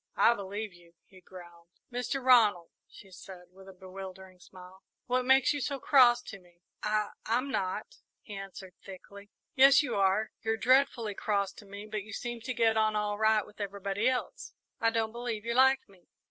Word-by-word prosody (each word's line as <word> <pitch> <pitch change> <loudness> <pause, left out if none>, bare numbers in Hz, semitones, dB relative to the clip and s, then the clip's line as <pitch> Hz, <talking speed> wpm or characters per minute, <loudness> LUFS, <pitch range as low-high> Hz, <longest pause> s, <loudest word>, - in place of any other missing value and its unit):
"I 235 - +5
believe 205 0 -6
you," 170 -1 -20
he 185 -2 -19
growled. 175 -2 -14 0.3
"Mr. 250 +2 -3
Ronald," 215 -9 +4 0.2
she 195 - -16
said, 180 0 -13
with 190 +1 -15
a - - -9
bewildering 190 0 -11
smile, 185 +1 -15 0.2
"what 250 0 0
makes 265 +2 +4
you 290 - -4
so 275 +2 -3
cross 245 -3 +5
to 200 - -10
me?" 175 -1 -25 0.2
"I 210 0 0 0.2
I'm 250 +5 0
not," 200 - -3 0.3
he 210 - -10
answered 195 -1 -9
thickly. 200 +1 -12 0.2
"Yes, 275 +3 +6
you - - -3
are 200 +2 +1
you're 220 0 -1
dreadfully 250 -3 +2
cross 200 -1 -1
to 205 - -15
me, 200 +1 -9
but 215 0 -4
you 215 +3 -11
seem 240 -1 -5
to 255 +3 -4
get 225 -1 +2
on 215 0 +2
all 210 0 -2
right 220 -1 +3
with 210 - -13
everybody 200 +2 -2
else. 255 -1 -5 0.2
I 230 - +3
don't 225 -1 -1
believe 235 -2 -5
you 235 - -1
like 265 +2 +3
me!" 190 -4 -23
210 Hz, 190 wpm, -29 LUFS, 190-240 Hz, 0.3 s, Yes